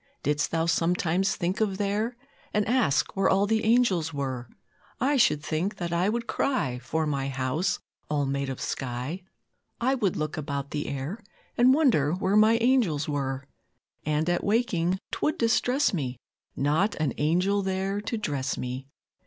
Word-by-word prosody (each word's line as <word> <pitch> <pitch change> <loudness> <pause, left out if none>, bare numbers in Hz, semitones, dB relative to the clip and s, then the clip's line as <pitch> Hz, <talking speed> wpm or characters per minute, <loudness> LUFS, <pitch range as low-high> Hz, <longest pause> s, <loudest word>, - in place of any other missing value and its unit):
Didst 150 +1 +1
Thou 165 0 0
sometimes 175 +2 +1
think 185 +5 -2
of 200 -3 +1
there, 210 +4 -1 0.4
And 210 -1 +2
ask 230 - +2
where 195 0 +3
all 195 +1 +3
the 220 +1 +1
angels 220 -8 +3
were? 130 -4 -4 0.5
I 275 +4 +2
should 150 - +3
think 170 +6 -1
that 170 -2 -4
I 175 +4 +2
would 230 +2 -1
cry 235 - 0
For 155 +6 -1
my 140 -2 -1
house 135 +8 0 0.3
all 145 -1 +1
made 140 0 -1
of 135 - -5
sky; 130 +7 -4 0.6
I 255 +3 +2
would 215 -9 0
look 155 0 -3
about 140 -2 -4
the 150 0 -3
air, 140 - -4 0.4
And 245 +2 +6
wonder 245 - +3
where 190 +2 0
my 215 +2 +6
angels 225 - +2
were; 135 -2 -2 0.6
And 155 +1 0
at 175 0 +1
waking 195 -5 +1
'twould 310 +3 0
distress 245 +4 +2
me 130 -8 -2 0.4
Not 155 +9 +1
an 155 -5 -1
angel 180 +7 +2
there 195 +1 -1
to 225 +2 -3
dress 140 -9 -2
me! 130 +2 -5
175 Hz, 160 wpm, -27 LUFS, 145-215 Hz, 0.6 s, And